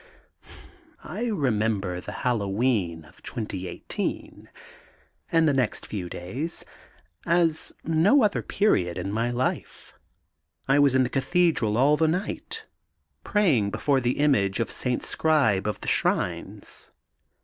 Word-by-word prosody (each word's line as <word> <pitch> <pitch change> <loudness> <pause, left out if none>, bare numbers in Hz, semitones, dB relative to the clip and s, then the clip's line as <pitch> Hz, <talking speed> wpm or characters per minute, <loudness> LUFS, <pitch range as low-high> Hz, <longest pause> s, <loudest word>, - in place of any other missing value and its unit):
I 220 +6 -4
remember 110 - 0
the 105 - -7
Halloween 100 -7 0
of - - -20
2018, 95 -5 -5 0.8
and 165 -1 +4
the 145 - +3
next 130 -4 -1
few 95 -5 -5
days, 130 - -5 0.6
as 170 -2 +2
no 175 - +4
other 210 - +1
period 90 - +1
in 100 - -3
my 115 +3 0
life. 120 +1 -3 0.7
I 135 +2 +4
was 140 -2 +4
in 130 - +5
the 125 - -1
Cathedral 140 - +1
all 145 +4 +4
the 160 - +3
night, 210 - -3 0.6
praying 160 - +2
before 140 +6 +1
the 120 +1 0
Image 125 -10 +2
of 115 - -1
St. 125 -1 -2
Scribe 140 -12 +2
of 105 - -3
the - - -8
Shrines. - - -1
130 Hz, 125 wpm, -26 LUFS, 105-160 Hz, 0.8 s, in